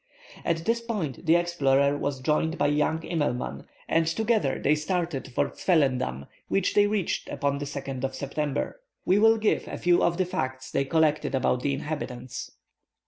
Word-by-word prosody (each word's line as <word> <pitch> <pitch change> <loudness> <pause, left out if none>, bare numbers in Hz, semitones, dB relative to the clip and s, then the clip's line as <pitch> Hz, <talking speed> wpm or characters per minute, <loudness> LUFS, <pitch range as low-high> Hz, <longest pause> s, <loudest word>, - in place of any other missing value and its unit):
At 165 -1 -1
this 235 +1 +1
point 185 - -4
the 165 - +6
explorer 140 -5 +2
was 140 -2 -3
joined 160 +4 +1
by - - +1
young 150 +2 +1
Immelman, 125 - -2 0.2
and 165 0 +2
together 215 - +1
they 145 - +3
started 165 -2 -2
for - - 0
Zwellendam, 130 - +1 0.2
which 195 -1 +1
they 205 0 +5
reached 205 -4 -1
upon 140 0 -1
the 145 - -3
2nd 135 -2 -5
of 135 0 -2
September. 145 - -3 0.2
We 190 +3 +4
will 225 +1 +6
give 215 -1 +1
a - - -5
few 175 0 +3
of 170 0 +2
the 185 - +2
facts 130 -6 -4
they 135 - +1
collected 155 -1 +2
about 125 -1 +1
the 140 0 0
inhabitants. 130 -4 -5
150 Hz, 170 wpm, -27 LUFS, 135-175 Hz, 0.2 s, the